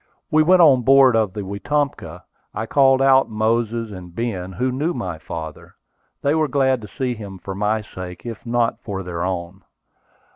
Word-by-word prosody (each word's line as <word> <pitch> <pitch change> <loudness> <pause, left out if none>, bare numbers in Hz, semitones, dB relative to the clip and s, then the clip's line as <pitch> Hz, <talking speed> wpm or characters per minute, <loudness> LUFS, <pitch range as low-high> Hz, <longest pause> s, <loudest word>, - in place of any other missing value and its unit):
We 155 - +5
went 180 +3 +5
on 135 -5 +6
board 135 0 +6
of 110 -4 +1
the 105 - -5
Wetumpka. 140 +9 -3 0.3
I 110 - -2
called 135 +1 +4
out 135 0 +4
Moses, 115 +1 -1
and 90 -3 -10
Ben, 95 -6 -3
who 125 +5 -1
knew 150 +7 -1
my 90 -10 -4
father. 80 0 -8 0.5
They 140 - +2
were 155 -1 +2
glad 130 -3 +1
to 105 - -9
see 125 +3 -3
him 100 -4 -9
for 95 +1 -7
my 105 +2 -1
sake, 90 -3 -9
if 115 -3 -7
not 120 -1 0
for 100 -3 -5
their 85 -1 -4
own. 90 0 -4
115 Hz, 180 wpm, -21 LUFS, 95-135 Hz, 0.5 s, on